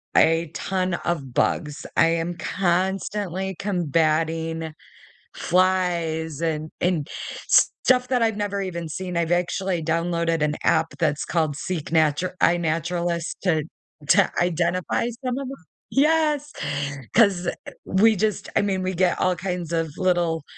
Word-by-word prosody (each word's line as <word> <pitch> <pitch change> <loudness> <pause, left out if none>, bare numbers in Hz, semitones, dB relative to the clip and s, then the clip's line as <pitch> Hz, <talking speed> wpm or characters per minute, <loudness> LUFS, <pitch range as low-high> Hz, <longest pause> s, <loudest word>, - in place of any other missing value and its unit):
a 165 -1 +4
ton 185 0 -1
of 140 -7 -2
bugs. 150 +2 0
I 165 - +6
am 165 +1 -1
constantly 190 +1 -1
combating 165 -3 0 0.6
flies 170 -4 +1
and 155 -2 -2
and 170 -4 0 0.4
stuff 250 -1 +3
that 250 -2 +1
I've 225 -2 +2
never 205 -1 -2
even 170 -3 -4
seen, 180 +2 -5
I've 170 0 +1
actually 180 0 0
downloaded 165 0 0
an 150 0 +1
app 160 0 +3
that's 150 -3 0
called 155 -4 0
Seek 170 -2 -4
Natur 160 +2 +2
iNaturalist 170 0 0
to 160 -5 +2 0.5
to 195 0 +5
identify 175 +4 0 0.2
some 255 0 -1
of 275 -2 -4
'em. 270 -8 -9 0.3
Yes, 300 0 +2 0.6
'cause, 200 -6 +4
eh, - - 0
eh, - - -8
we 220 +4 +4
just 215 +2 -1
I - - +4
mean, 195 -2 0
we 185 0 -2
get 180 0 +2
all 185 -1 +2
kinds 180 -3 -4
of 165 -1 0
little, 175 -4 +1
175 Hz, 135 wpm, -24 LUFS, 165-190 Hz, 0.6 s, I